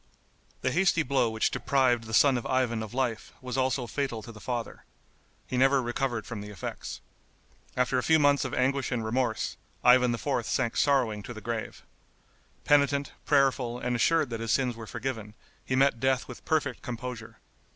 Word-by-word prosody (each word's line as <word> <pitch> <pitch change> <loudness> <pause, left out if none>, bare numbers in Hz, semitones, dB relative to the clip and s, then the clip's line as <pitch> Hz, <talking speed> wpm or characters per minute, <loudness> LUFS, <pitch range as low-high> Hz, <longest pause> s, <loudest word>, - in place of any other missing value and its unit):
The 130 - +1
hasty 170 +1 +3
blow 135 -4 +1
which 110 0 0
deprived 125 -4 +1
the 110 - -8
son 135 +3 +5
of 120 - -3
Ivan 125 -4 0
of 110 -2 -6
life 125 -4 -2
was 125 -1 -5
also 130 -1 0
fatal 120 -2 -3
to 115 - -9
the 110 - -12
father. 120 -1 -4 0.6
He 130 - -3
never 135 +2 +4
recovered 120 -2 -2
from 110 -3 -6
the 105 - -8
effects. 100 -4 -6 0.8
After 125 0 +2
a - - 0
few 160 +4 +4
months 145 -2 +3
of 130 - -3
anguish 135 +1 0
and 115 -3 -1
remorse, 120 0 -1 0.3
Ivan 125 0 +6
IV. 120 +1 -1
sank 120 -3 0
sorrowing 125 -7 +2
to 120 +4 -8
the - - -7
grave. 115 +1 -5 0.8
Penitent, 140 -1 +3 0.2
prayerful 135 -4 +2
and 125 0 -2
assured 155 +2 +2
that 115 - -3
his 115 0 -2
sins 125 -3 +1
were 115 -1 -9
forgiven, 115 -3 -5 0.3
he 130 - -1
met 135 -2 +3
death 130 +1 +1
with 125 - -11
perfect 145 -5 0
composure. 120 -2 -7
125 Hz, 180 wpm, -28 LUFS, 115-135 Hz, 0.8 s, Ivan